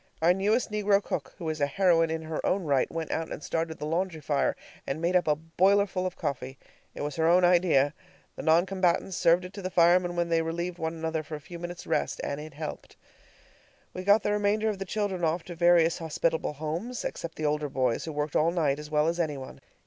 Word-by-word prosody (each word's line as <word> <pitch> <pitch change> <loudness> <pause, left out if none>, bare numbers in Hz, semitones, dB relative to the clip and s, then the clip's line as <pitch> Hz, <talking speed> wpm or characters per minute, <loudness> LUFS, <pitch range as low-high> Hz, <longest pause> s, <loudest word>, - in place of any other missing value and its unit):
Our 170 +2 +4
newest 210 +5 +1
negro 205 -1 +3
cook, - - -4
who 170 - -6
is 155 -1 -3
a 145 - +3
heroine 165 0 +3
in 160 0 -3
her 160 0 -4
own 195 0 +1
right, 140 -5 +1
went 165 -1 -4
out 160 0 -2
and 150 - -6
started 165 -1 -2
the - - -5
laundry 165 +1 -1
fire 145 -2 0 0.3
and 135 - -2
made 170 +2 0
up 180 - +3
a 150 - +4
boilerful 185 +4 +1
of 185 - -6
coffee. 135 -4 -4 0.4
It - - -6
was 150 +2 -4
her 160 0 +2
own 180 +2 +5
idea. 170 -6 +4 0.4
The - - -6
non 165 +2 +4
combatants 185 -1 0
served 170 +3 +3
it 180 - -9
to 200 - -7
the 185 - -3
firemen 175 0 +4
when 170 -1 0
they 165 -1 +2
relieved 170 +2 -3
one 160 +1 -2
another 160 -1 -2
for 155 0 -7
a - - -7
few 170 +3 -10
minutes' 175 0 -7
rest, - - -1
and 140 +1 -3
it 155 -1 -10
helped. 155 0 -7 1.0
We 185 - -5
got 205 +3 +4
the 205 - 0
remainder 210 +1 +1
of 205 -3 -3
the 195 - -3
children 195 -2 -2
off 165 +1 +1
to 175 - -8
various 170 -1 +4
hospitable 160 -1 -1
houses, 165 - -4
except 170 -1 -5
the 155 - -3
older 150 0 0
boys, 130 -3 0
who 160 - -4
worked 150 0 -3
all 160 +2 +4
night 155 -5 0
as 150 0 -8
well 150 0 +2
as 170 +1 -1
any 155 -4 -1
one. 130 -1 -10
165 Hz, 235 wpm, -28 LUFS, 155-180 Hz, 1.0 s, own